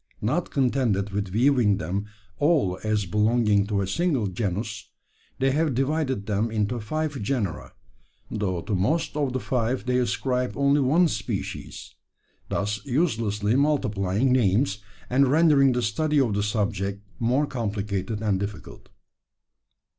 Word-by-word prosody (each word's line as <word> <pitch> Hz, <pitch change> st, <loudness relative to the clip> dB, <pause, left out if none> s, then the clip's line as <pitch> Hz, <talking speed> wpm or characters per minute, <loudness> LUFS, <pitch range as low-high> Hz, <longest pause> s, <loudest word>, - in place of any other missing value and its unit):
Not 150 Hz, +11 st, 0 dB
contented 120 Hz, -7 st, 0 dB
with 100 Hz, 0 st, -2 dB
viewing 115 Hz, 0 st, +3 dB
them 95 Hz, +5 st, -3 dB, 0.3 s
all 145 Hz, -, +2 dB
as 105 Hz, -2 st, 0 dB
belonging 105 Hz, +1 st, +2 dB
to 100 Hz, -2 st, 0 dB
a 95 Hz, -, -2 dB
single 150 Hz, -, 0 dB
genus, 105 Hz, +2 st, -3 dB, 0.5 s
they 135 Hz, +1 st, +2 dB
have 150 Hz, -1 st, +1 dB
divided 135 Hz, -5 st, 0 dB
them 105 Hz, +2 st, 0 dB
into 110 Hz, +2 st, -1 dB
five 150 Hz, +4 st, -3 dB
genera 105 Hz, -6 st, -2 dB, 0.6 s
though 95 Hz, -5 st, -2 dB
to 110 Hz, -, -3 dB
most 125 Hz, -, 0 dB
of 145 Hz, -3 st, 0 dB
the 130 Hz, -, -2 dB
five 125 Hz, 0 st, -1 dB
they 125 Hz, 0 st, +1 dB
ascribe 125 Hz, +1 st, -1 dB
only 140 Hz, +1 st, +3 dB
one 160 Hz, +7 st, +4 dB
species! 105 Hz, -8 st, -5 dB, 0.6 s
thus 105 Hz, +1 st, -2 dB
uselessly 115 Hz, -, 0 dB
multiplying 120 Hz, -6 st, +1 dB
names, 105 Hz, -3 st, +2 dB, 0.3 s
and 135 Hz, +2 st, +3 dB
rendering 145 Hz, -2 st, +5 dB
the 125 Hz, 0 st, -1 dB
study 150 Hz, +8 st, +1 dB
of 120 Hz, -6 st, +2 dB
the 100 Hz, -, 0 dB
subject 100 Hz, -1 st, -2 dB, 0.2 s
more 125 Hz, +5 st, +2 dB
complicated 105 Hz, -3 st, -3 dB
and 100 Hz, -3 st, +1 dB
difficult. 100 Hz, 0 st, -7 dB
115 Hz, 135 wpm, -25 LUFS, 100-135 Hz, 0.6 s, rendering